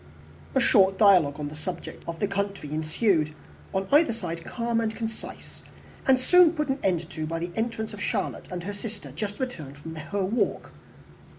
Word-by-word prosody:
A - - +5
short 195 -1 +5
dialogue 180 -9 +5
on 145 -1 -3
the 150 - -9
subject 170 +3 -6
of 165 -1 -4
the 205 - +1
country 195 -6 -3
ensued, 155 0 +1 0.4
on 190 0 -1
either 290 -4 +5
side 170 -7 -5
calm 235 -1 -1
and 220 -1 -1
concise 225 -1 -7 0.5
and 265 -1 +6
soon 350 +4 +6
put 300 -3 -1
an 270 +1 0
end 175 -4 +1
to 155 -2 -4
by 165 +1 -2
the 170 +1 -3
entrance 225 -1 -2
of 205 - -8
Charlotte - - -2
and 180 -1 -5
her 205 +3 -4
sister, 205 +1 -7
just 205 -1 -4
returned 160 - -5
from 160 +3 -8
their 155 -1 -8
walk. 200 +4 0
195 Hz, 185 wpm, -27 LUFS, 165-230 Hz, 0.5 s, and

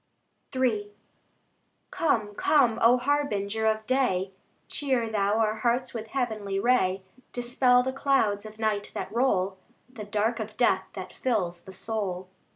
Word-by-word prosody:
III 220 -6 0 1.0
Come, 220 -10 0
come, 240 -1 +3
O 240 +2 +6
Harbinger 225 -6 0
of 220 0 0
day! 205 -8 +1 0.4
Cheer 260 -5 0
Thou 205 0 +1
our 220 -1 +1
hearts 240 +3 0
with 225 -2 -5
heavenly 215 -6 -2
ray, 195 -5 +2 0.3
Dispel 250 +1 +3
the 260 +1 -2
clouds 265 -8 +1
of 215 0 -11
night 215 -2 -1
that - - -5
roll, 195 -6 +1 0.3
The 245 -5 -9
dark 215 +3 0
of 215 0 -6
death 215 -6 +3
that 185 -2 -7
fills 180 -9 -2
the 190 - -10
soul. 190 -3 -4
220 Hz, 140 wpm, -27 LUFS, 205-250 Hz, 1.0 s, O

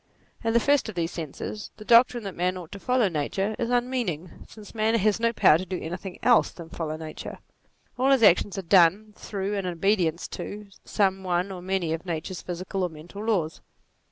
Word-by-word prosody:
In 225 0 +1
the 235 - +5
first 280 -1 +2
of 215 - -7
these 170 -1 -1
senses, 170 +6 -6
the 215 - -11
doctrine 240 0 +5
that 195 -2 -5
man 180 +1 -1
ought 175 -3 -9
to 200 - -8
follow 250 0 +2
nature 190 +6 -2
is 235 -1 -1
unmeaning; 240 - -2
since 215 -2 -13
man 220 0 +1
has 215 0 +2
no 230 0 +2
power 160 -8 +5
to - - -3
do 185 0 -3
anything 180 +3 -6
else 245 -2 +5
than 170 -2 -11
follow 155 -2 -4
nature; 155 -1 -7 0.6
all 265 +2 +3
his 270 -4 +4
actions 200 0 +4
are 195 - -3
done 190 +4 +4
through, 200 0 -4
and 195 -2 -2
in 180 - -2
obedience 175 -2 +1
to, 210 0 -7
some 195 -2 +1
one 180 +1 -1
or 185 -2 -7
many 185 -3 -1
of 165 - -4
nature's 170 +1 -4
physical 185 +2 -4
or 180 - 0
mental 170 +6 -10
laws. 185 -8 -1
190 Hz, 205 wpm, -26 LUFS, 170-215 Hz, 0.6 s, the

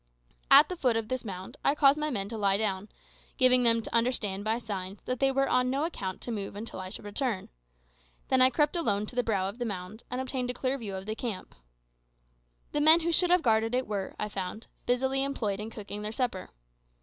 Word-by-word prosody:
At 280 +2 +9
the 365 - -4
foot 250 -8 +1
of 225 -1 -3
this 255 -1 -2
mound 190 -4 -7
I 280 - +3
caused 285 0 +5
my 305 0 -1
men 200 -8 -2
to 225 - -5
lie 200 -1 +3
down, 205 -1 -2 0.5
giving 255 -1 +5
them 230 -1 +4
to - - -5
understand, 230 -5 0
by 220 +2 0
signs, 200 -4 -5
that 255 -1 -2
they 270 0 +3
were 275 0 +1
on 250 0 +2
no 275 +3 0
account 190 - -5
to 240 - -5
move 200 -3 -4
until 215 0 -6
I 185 0 -6
should 200 - -8
return. 205 -1 -2 0.8
Then 260 -1 +4
I 255 - +7
crept 295 +5 +1
alone 210 -11 +1
to 245 - -10
the 250 - +3
brow 200 -5 0
of 200 +5 -7
the - - -1
mound, 200 +1 -6
and 250 - -3
obtained 260 -1 -2
a 250 - -3
clear 265 +2 -1
view 205 -5 -5
of 190 0 -6
the 215 - -3
camp. 220 -4 -5 1.2
The 295 - 0
men 315 +3 +7
who 340 +1 0
should 355 +2 +3
have 360 -1 +4
guarded 225 0 +2
it 255 - 0
were, 200 -2 -4
I 210 - -2
found, 200 +2 -5 0.2
busily 265 +2 +1
employed 220 -8 -2
in 215 +1 -5
cooking 210 -2 -7
their 210 0 -4
supper. 230 -5 -2
230 Hz, 230 wpm, -29 LUFS, 205-260 Hz, 1.2 s, At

